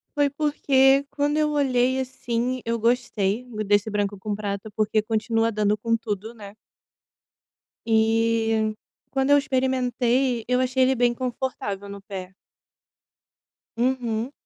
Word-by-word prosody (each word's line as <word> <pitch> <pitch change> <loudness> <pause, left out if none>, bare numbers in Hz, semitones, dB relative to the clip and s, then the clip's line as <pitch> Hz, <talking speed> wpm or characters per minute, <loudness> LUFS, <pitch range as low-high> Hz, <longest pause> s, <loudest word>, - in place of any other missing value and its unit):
Foi 290 -1 +3
porque, 275 -2 +3
quando 290 +1 0
eu 305 -1 +2
olhei, 260 -2 +2
assim, 250 -1 -2
eu 230 0 -1
gostei 230 -1 0 0.2
desse 205 +1 +2
branco 205 -1 -1
com 205 +1 -3
prata, 200 0 -4
porque 215 0 +1
continua 225 +1 0
dando 210 -1 +1
com 230 +2 0
tudo, 220 +1 -5
né. 205 -2 -11 1.3
E, 225 -1 +2 0.4
quando 270 +1 +1
eu 285 - +7
experimentei, 255 -2 0
eu 250 +1 +2
achei 255 0 +2
ele 260 +1 +3
bem 240 0 +2
confortável 235 -5 -4
no 200 0 -8
pé. 190 -2 -8 1.4
Uhum. 240 -1 -1
235 Hz, 125 wpm, -24 LUFS, 215-260 Hz, 1.4 s, eu